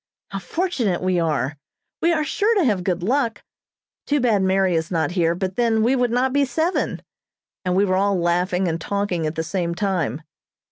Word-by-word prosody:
How 195 - -3
fortunate 235 - -1
we 185 -1 +1
are. 150 -3 -1 0.4
We 340 - +3
are 310 -2 +1
sure 420 +10 +1
to 390 - +3
have 205 -7 +1
good 180 -2 -1
luck. 235 +2 0 0.6
Too 290 0 +2
bad 230 -6 +2
Mary 190 -1 +2
is 160 0 -1
not 160 -4 0
here, 170 -2 +1
but 185 +1 -3
then 225 -2 +2
we 250 +4 +3
would 245 -1 +1
not 255 +2 +1
be 285 0 +3
seven," 320 +7 -1 0.6
and 180 0 +1
we 200 +2 +4
were 185 -1 +1
all 200 -1 +2
laughing 180 +2 +1
and 165 0 -2
talking 200 -5 -1
at 155 - -4
the 160 - -1
same 170 0 -2
time. 175 - -1
190 Hz, 195 wpm, -22 LUFS, 175-245 Hz, 0.6 s, we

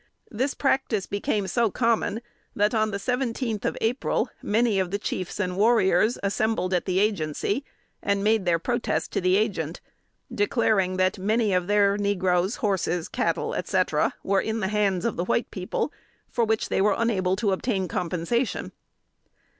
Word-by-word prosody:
This 260 +6 -1
practice 265 -8 0
became 200 0 -1
so 230 +4 +1
common 230 0 0 0.3
that, 210 +2 +2
on 215 -1 +2
the 200 - -2
seventeenth 235 -1 -2
of - - -1
April, 235 +4 0
many 220 -1 +2
of 185 -2 0
the 200 - -1
chiefs 185 -2 -4
and 180 -3 -1
warriors 215 0 +3
assembled 200 -1 0
at 180 - +1
the 185 -1 0
Agency, 200 - 0 0.4
and 200 0 0
made 215 -1 +3
their 170 -1 +4
protest 240 +8 -1
to - - -1
the 185 +1 +3
Agent, 185 -7 -1 0.5
declaring 205 -3 +1
that 185 +2 +1
"many 215 +1 +1
of 180 -1 +1
their 205 0 +3
negroes, 190 -1 +1
horses, 185 -5 -1
cattle, - - -1
etc., - - 0
were 195 0 +2
in 220 0 -2
the 190 -3 -1
hands 205 -3 +1
of 235 - -1
the 175 - -1
white 230 - 0
people, 185 +9 -3 0.4
for 235 - +1
which 220 0 0
they - - +1
were 210 +1 +3
unable 190 -5 +1
to 205 0 0
obtain 190 -1 -1
compensation." 180 +8 -2
205 Hz, 160 wpm, -25 LUFS, 185-225 Hz, 0.5 s, their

